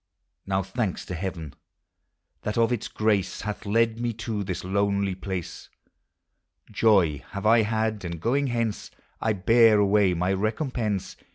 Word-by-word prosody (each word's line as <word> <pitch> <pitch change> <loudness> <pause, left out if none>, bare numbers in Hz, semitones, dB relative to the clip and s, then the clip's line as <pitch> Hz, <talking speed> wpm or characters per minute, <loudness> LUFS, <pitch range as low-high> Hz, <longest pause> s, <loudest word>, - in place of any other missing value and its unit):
Now 95 0 0
thanks 95 0 -3
to - - -6
Heaven! 85 -4 -5 0.9
that 105 - -3
of 115 +1 +3
its 115 - -3
grace 105 -3 0
Hath 105 0 -5
led 115 +2 +2
me 120 -1 -1
to 110 -1 -4
this 90 -2 -4
lonely 100 +1 0
place; 95 -2 -6 1.0
Joy 95 - +3
have 100 +1 -5
I 115 +1 +6
had; 110 -1 -1
and 85 -2 -5
going 135 - +1
hence 115 -3 -2 0.3
T 110 - +2
bear 115 +3 +5
away 100 -2 +3
my 90 +3 0
recompense. 110 -1 -2
105 Hz, 145 wpm, -26 LUFS, 95-115 Hz, 1.0 s, I